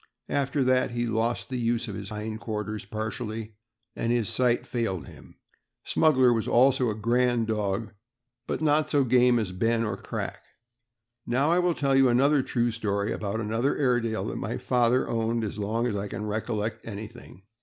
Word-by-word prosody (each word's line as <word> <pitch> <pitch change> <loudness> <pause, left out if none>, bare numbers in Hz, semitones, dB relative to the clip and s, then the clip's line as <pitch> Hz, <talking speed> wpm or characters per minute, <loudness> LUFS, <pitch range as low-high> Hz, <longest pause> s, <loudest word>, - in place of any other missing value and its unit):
After 140 0 0
that 130 0 +2
he 120 0 -2
iost 115 -2 -1
the 130 -1 -3
use 115 0 0
of 105 - -5
his 100 0 -6
hind 110 +1 -5
quarters, 105 -2 -4
partially, 110 +1 -5 0.4
and 115 - -1
his 120 -3 +1
sight 125 -1 +1
failed 110 - -2
him. - - -14 0.5
Smuggler 130 -6 +4
was 115 -2 -1
also 130 0 +4
a 105 - -2
grand 120 +1 +1
dog, 105 -1 -2 0.5
but - - -2
not 155 0 +2
so 145 -2 +3
game 125 -1 +4
as 105 -5 -1
Ben 115 +5 +1
or 105 -3 -2
Crack. - - -5 0.8
Now 135 +6 +2
I 175 - +4
will 175 -2 +1
tell 140 -1 +1
you 135 -1 +5
a 140 +4 +4
true 120 -2 0
story 105 -2 -1
about 105 -1 -3
another 115 +5 0
Airedale 120 -5 +1
that - - -5
my - - -3
father 125 0 +2
owned, 115 0 -1
as 105 0 -4
long 110 +3 -1
ago 105 -5 -1
as 100 - -3
I - - -5
can 105 +1 -5
recollect 110 0 -3
anything. 110 -2 -9
115 Hz, 180 wpm, -27 LUFS, 110-125 Hz, 0.8 s, you